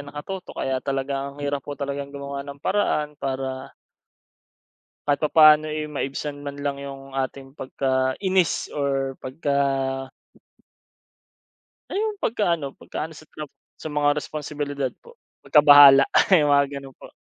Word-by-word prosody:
nakatutok 145 +6 -8
kaya 130 -1 -1
talaga 135 0 -2
ang 140 - -12
hirap 140 0 -1
po 145 +2 -7
talagang 140 0 -4
gumawa 140 0 -5
ng 140 0 -10
paraan 150 -7 0
para 130 -1 -4 1.3
kahit 145 -1 +2
papaano, 155 0 +6
eh, 155 0 -3
maibsan 145 0 -5
man 140 0 -6
lang 140 -1 -2
'yung 135 -1 -9
ating 135 +1 -4
pagka-inis 135 +8 0
or 135 -2 -1
pagka 140 +1 -2 2.3
ay - - -3
'yung 425 -1 -2
pagkaano 170 - -1
pagkaano 160 0 -6
sa 155 - -14
trab 150 -2 -9 0.2
sa 155 - -8
mga 145 -1 +2
responsibilidad 145 -2 -4
po, 475 0 -17 0.2
pagkabahala 145 -2 +8 0.3
'yung 145 -2 +3
mga 140 0 +4
gano'n 135 -1 -10
po. - - -14
145 Hz, 130 wpm, -23 LUFS, 135-150 Hz, 2.3 s, pagkabahala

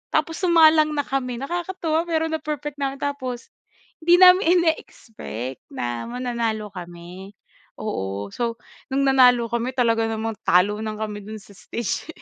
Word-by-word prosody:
Tapos 325 - 0
sumalang 315 -3 +5
na 290 - 0
kami 255 -3 -2
nakakatuwa 335 +3 -2
pero 320 -1 0
na 320 - -1
perfect 295 -1 -5
namin. 275 -1 -1
Tapos 260 -4 -4 0.5
hindi 345 +2 +5
namin 365 +1 +8 0.2
ineexpect 135 - -4 0.2
na 120 -1 -3
mananalo 235 -4 -3
kami. 180 +2 -10 0.4
Oo, 100 - -4
so 235 -1 -2 0.3
nung 275 +1 +1
nanalo 250 -4 +4
kami 235 +2 -2
talaga 230 -2 +2
namang 225 -1 -3
talunan 210 +5 +2
kami 210 -1 -5
dun 215 +1 -7
sa 205 - -17
stage. 235 +6 -4
240 Hz, 140 wpm, -23 LUFS, 210-295 Hz, 0.5 s, namin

